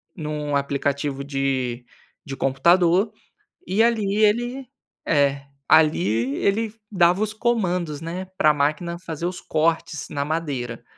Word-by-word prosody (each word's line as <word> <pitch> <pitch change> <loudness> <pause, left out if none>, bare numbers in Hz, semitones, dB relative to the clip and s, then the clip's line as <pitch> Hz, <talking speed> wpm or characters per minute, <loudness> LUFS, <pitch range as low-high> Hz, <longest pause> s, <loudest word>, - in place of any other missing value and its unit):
num 150 -3 -3
aplicativo 140 0 -1
de 135 -3 -2 0.4
de 140 -3 -6
computador, 170 - +3 0.5
e 195 +5 +2
ali 220 -4 +1
ele 240 +4 0 0.4
é, 140 -2 +1 0.2
ali 135 -5 +3
ele 215 +2 0 0.2
dava 180 +1 +3
os 215 0 -1
comandos, 180 -10 -1
né, 175 +3 -5
para 155 0 +5
máquina 155 +4 -1
fazer 165 -2 -5
os 180 0 -4
cortes 160 -1 -1
na 140 0 -2
madeira. 140 -7 -3
160 Hz, 120 wpm, -23 LUFS, 140-185 Hz, 0.5 s, para